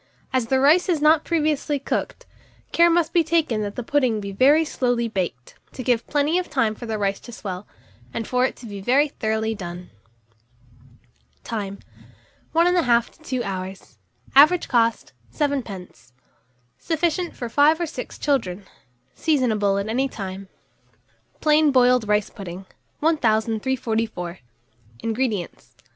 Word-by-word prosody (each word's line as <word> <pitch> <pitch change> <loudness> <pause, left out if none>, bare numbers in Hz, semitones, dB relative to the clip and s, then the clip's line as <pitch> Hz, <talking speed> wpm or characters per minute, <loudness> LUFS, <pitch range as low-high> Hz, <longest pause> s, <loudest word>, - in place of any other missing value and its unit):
As 255 -3 +1
the 265 +2 +2
rice 310 +8 +4
is 335 -4 +2
not 305 +1 +4
previously 305 -3 0
cooked, 275 - -3 0.5
care 340 0 +5
must 335 -1 +1
be 340 - +4
taken 315 -9 +1
that 205 -1 -4
the 245 - -4
pudding 255 -4 +1
be 200 -1 -5
very 285 +10 +4
slowly 245 -5 0
baked, 180 - -4 0.2
to 255 - -6
give 240 -2 +1
plenty 295 +4 +1
of 365 - -5
time 230 -6 +1
for 235 +2 -9
the 220 -1 -2
rice 200 -1 -1
to 240 - -12
swell, 195 -3 -6 0.4
and 225 - -4
for 250 0 +1
it 260 - 0
to - - -13
be 200 -3 -7
very 275 +8 +3
thoroughly 220 -3 -1
done. 180 -3 -8 1.5
Time. 200 -3 -4 0.7
1 335 +1 +3
1/2 250 -10 +3
to - - -26
2 255 -5 -3
hours. 190 -1 -6 0.4
Average 305 +6 +6
cost, 230 -2 +1 0.2
7d. 230 - -4 0.7
Sufficient 340 +1 -1
for 240 - -5
5 295 +7 +4
or - - +1
6 315 - -7
children. 205 -9 -1 0.5
Seasonable 220 -10 +1
at 200 +1 -2
any 260 +5 0
time. 195 -3 -7 0.9
PLAIN 305 -1 +4
BOILED 250 -3 +4
RICE 210 -1 +1
PUDDING. 185 -1 -8 0.4
1344. 225 - 0 0.6
INGREDIENTS. 225 -5 -3
240 Hz, 140 wpm, -23 LUFS, 210-295 Hz, 1.5 s, Average